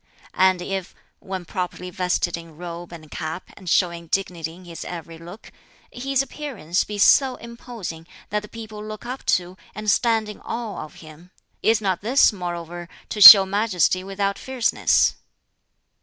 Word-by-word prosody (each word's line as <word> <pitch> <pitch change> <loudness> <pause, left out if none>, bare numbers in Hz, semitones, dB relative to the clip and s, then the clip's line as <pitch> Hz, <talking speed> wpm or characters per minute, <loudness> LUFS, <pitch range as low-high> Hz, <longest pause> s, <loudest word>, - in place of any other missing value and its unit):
And 185 -1 +3
if 190 -1 -5 0.2
when 190 -2 -6
properly 180 0 -5
vested 180 -1 -1
in 165 -2 -12
robe 175 0 -8
and 155 -3 -12
cap, 160 +2 -6
and 185 -3 -8
showing 170 -2 +1
dignity 170 -3 -3
in 185 +1 -15
his 170 -1 -8
every 165 -1 -8
look 175 +5 -12 0.4
his 270 +2 -1
appearance 245 - -3
be 210 - -7
so 260 +5 +5
imposing 235 -9 -9 0.2
that 210 - +1
the 210 - -11
people 215 -1 -9
look 215 +1 -8
up 255 +2 -6
to 180 +1 -10 0.2
and 215 0 0
stand 225 -2 +1
in 210 - -9
awe 230 -7 -5
of 155 - -12
him, 155 +3 -15 0.3
is 225 0 +2
not 190 -4 -1
this 240 +2 +4
moreover 175 -2 -6 0.2
to 210 - -4
show 195 -1 +13
majesty 190 -3 +1
without 195 0 -2
fierceness?" 260 -3 +1
190 Hz, 155 wpm, -22 LUFS, 175-215 Hz, 0.4 s, show